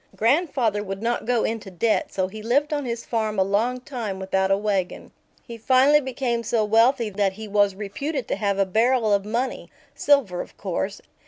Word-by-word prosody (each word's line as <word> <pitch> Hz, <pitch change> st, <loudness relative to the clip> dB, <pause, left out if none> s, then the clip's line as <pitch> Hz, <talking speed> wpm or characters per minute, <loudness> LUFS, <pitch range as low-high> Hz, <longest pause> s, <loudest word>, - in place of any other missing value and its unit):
Grandfather 235 Hz, -, +1 dB
would 195 Hz, +1 st, -6 dB
not 235 Hz, -1 st, -1 dB
go 245 Hz, -2 st, +2 dB
into 220 Hz, -3 st, -3 dB
debt, 205 Hz, +5 st, 0 dB
so 185 Hz, -1 st, -1 dB
he 215 Hz, +3 st, -9 dB
lived 285 Hz, +7 st, +1 dB
on 290 Hz, -2 st, -2 dB
his 235 Hz, -1 st, -4 dB
farm 220 Hz, -2 st, -2 dB
a 190 Hz, -, +4 dB
long 220 Hz, +6 st, 0 dB
time 245 Hz, -8 st, -5 dB
without 190 Hz, 0 st, 0 dB
a 195 Hz, -, +3 dB
wagon. 200 Hz, -3 st, -2 dB, 0.3 s
He 230 Hz, -1 st, -9 dB
finally 265 Hz, +5 st, +4 dB
became 250 Hz, -3 st, -2 dB
so 230 Hz, -1 st, 0 dB
wealthy 230 Hz, +2 st, +3 dB
that 195 Hz, -1 st, 0 dB
he 220 Hz, +2 st, -8 dB
was 205 Hz, -1 st, +2 dB
reputed 240 Hz, +7 st, -4 dB
to -, -, 0 dB
have 200 Hz, -1 st, 0 dB
a 195 Hz, -, +3 dB
barrel 225 Hz, +2 st, +2 dB
of 200 Hz, 0 st, +1 dB
money 240 Hz, +5 st, -3 dB, 0.2 s
silver, 260 Hz, -12 st, +2 dB
of -, -, -11 dB
course. 195 Hz, +1 st, -3 dB
220 Hz, 190 wpm, -23 LUFS, 200-250 Hz, 0.3 s, a